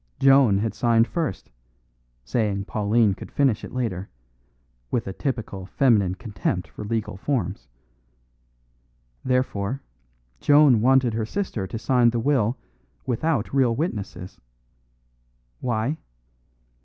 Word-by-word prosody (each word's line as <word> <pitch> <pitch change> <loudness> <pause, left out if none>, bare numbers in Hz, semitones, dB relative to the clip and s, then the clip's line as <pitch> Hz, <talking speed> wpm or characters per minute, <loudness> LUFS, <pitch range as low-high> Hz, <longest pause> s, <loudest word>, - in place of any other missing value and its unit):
Joan 135 -7 +5
had 110 +2 -1
signed 115 -1 +3
first, 160 - -3 0.7
saying 105 -4 -1
Pauline 105 0 +2
could - - -10
finish 135 -7 +1
it - - -7
later, 110 -7 -3 0.8
with 115 - -1
a 95 - -5
typical 110 -7 -4
feminine 100 -6 +2
contempt 95 -3 -3
for - - -9
legal 110 -3 -3
forms. 95 - -2 1.6
Therefore, 130 -1 -1 0.6
Joan 145 -6 +5
wanted 130 -1 +4
her 110 -1 -1
sister 120 - -3
to 105 - -5
sign 120 +1 +3
the 120 0 -1
will 125 -2 +1 0.5
without 125 -1 -1
real 130 -4 +3
witnesses. 105 - -4 1.2
Why? 120 +5 -1
115 Hz, 110 wpm, -24 LUFS, 100-130 Hz, 1.6 s, Joan